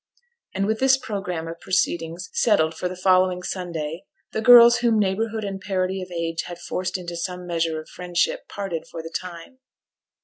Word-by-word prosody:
And 195 +1 +1
with 220 +1 0
this 265 0 +5
programme 195 -9 -4
of 165 0 -7
proceedings 175 -1 -1
settled 165 -8 +3
for 180 +2 -3
the 185 - -6
following 185 0 +2
Sunday, 170 -3 -4 0.3
the 220 - -2
girls 235 0 +9
whom 235 -2 +2
neighbourhood 215 +3 0
and 195 -1 -5
parity 190 0 -1
of 185 - -7
age 165 -1 -2
had 175 - -7
forced 185 +2 -3
into 175 -1 -6
some 180 +1 -4
measure 165 -2 -1
of 155 - -11
friendship 185 - -1
parted 195 -5 -5
for 165 - -7
the 165 - -9
time. 180 +8 -7
185 Hz, 175 wpm, -23 LUFS, 170-200 Hz, 0.3 s, girls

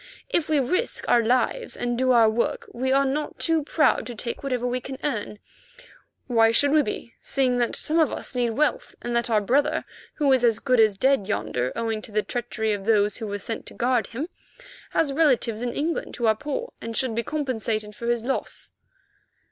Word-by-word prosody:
If 340 -11 0
we 305 -2 +3
risk 365 - -1
our 240 - +5
lives 255 - 0
and 240 0 -1
do 255 +1 +2
our 230 -2 +6
work, 220 +2 -1
we 260 +2 -1
are 275 +1 +4
not 295 +3 -2
too 325 -1 +1
proud 300 -1 +2
to 240 - -6
take 235 +2 -4
whatever 255 -3 -2
we 250 +1 0
can 265 +1 -7
earn. 210 -7 -2 0.9
Why 225 -2 +4
should 285 +5 +3
we 305 0 +5
be, 235 -2 -5
seeing 255 -3 +1
that 240 - 0
some 320 +2 +1
of 315 - +3
us - - -4
need 245 -1 +1
wealth, 300 - 0
and 240 0 -2
that 235 0 +1
our 215 -2 +3
brother, 285 +8 +1 0.3
who 285 -3 +3
is 255 -2 +2
as 230 -3 +4
good 255 0 +1
as 215 -3 +4
dead 265 -4 +2
yonder, 125 -11 -1
owing 225 -2 -2
to 215 - -11
the 210 0 +1
treachery 235 -3 -2
of 200 -1 -5
those 210 -2 +2
who 225 - -5
were 205 0 -3
sent 225 +3 -5
to - - -7
guard 245 -1 +1
him, 270 +8 -5 0.6
has 285 -4 +1
relatives 255 -7 +2
in 245 -1 -1
England 320 +6 -2
who 235 - -2
are 220 -1 +4
poor 300 - -4
and 230 0 -4
should 255 -4 +1
be 230 - 0
compensated 225 -7 -3
for 235 - -6
his 235 -1 +1
loss?" 270 - -3
245 Hz, 210 wpm, -25 LUFS, 225-275 Hz, 0.9 s, our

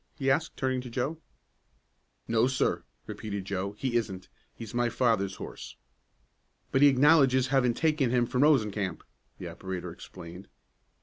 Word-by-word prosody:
he 135 -3 +1
asked, 155 +4 -1
turning 130 -1 0
to 125 - -8
Joe. 135 +7 -2 1.1
"No, 115 +1 +3
sir!" 130 0 0 0.2
repeated 100 -3 -5
Joe. 100 +1 -3
"He 120 +3 -1
isn't. 95 -5 -4 0.3
He's 115 -3 -9
my 120 0 +1
father's 110 -6 +1
horse." - - -9 1.0
"But 135 - +2
he 145 - +9
acknowledges 135 -2 +4
having 125 -3 +2
taken 155 -4 +1
him 120 0 +2
from 125 +2 -1
Rosencamp," 105 - +2 0.3
the - - -7
operator 95 -2 -6
explained. 85 +3 -11
120 Hz, 140 wpm, -28 LUFS, 100-135 Hz, 1.1 s, he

